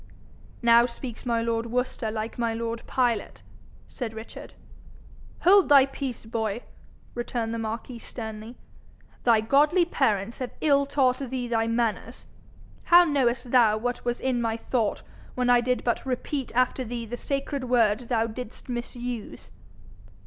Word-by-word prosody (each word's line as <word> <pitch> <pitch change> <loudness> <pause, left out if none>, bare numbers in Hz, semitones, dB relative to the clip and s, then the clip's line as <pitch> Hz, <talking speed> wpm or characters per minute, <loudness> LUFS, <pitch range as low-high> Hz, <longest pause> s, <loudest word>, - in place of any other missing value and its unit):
'Now 235 0 +6
speaks 240 0 -8
my 230 -1 +1
lord 230 0 -1
Worcester 250 -1 -2
like 220 +2 -5
my 230 -1 0
lord 230 0 -3
Pilate,' 240 -5 -1 0.4
said 225 -4 -6
Richard. 220 +1 -10 0.9
'Hold 385 0 +6
thy 280 -2 +8
peace, 270 -4 -6
boy,' 220 0 -3 0.5
returned 240 -1 -3
the 230 - -3
marquis 225 +2 -5
sternly. 220 0 -8 0.7
'Thy 230 -3 +5
godly 295 +10 +4
parents 225 - 0
have 255 -2 -5
ill 280 -2 +3
taught 255 -3 +2
thee 260 -2 -3
thy 225 -1 0
manners. 230 -1 -2 0.6
How 350 +1 +8
knowest 255 -6 0
thou 225 -4 +5
what 245 +2 -3
was 240 0 -1
in 255 -2 0
my 225 -1 -1
thought 230 -2 -1 0.3
when 250 -1 +2
I 245 0 +5
did 250 +1 -1
but 235 -2 0
repeat 265 +1 -3
after 255 +1 +2
thee 235 0 -5
the 235 +2 -5
sacred 275 +1 -3
word 235 -1 +2
thou 225 -2 +2
didst 235 +2 -8
misuse?' 240 - -5
240 Hz, 145 wpm, -26 LUFS, 225-255 Hz, 0.9 s, thy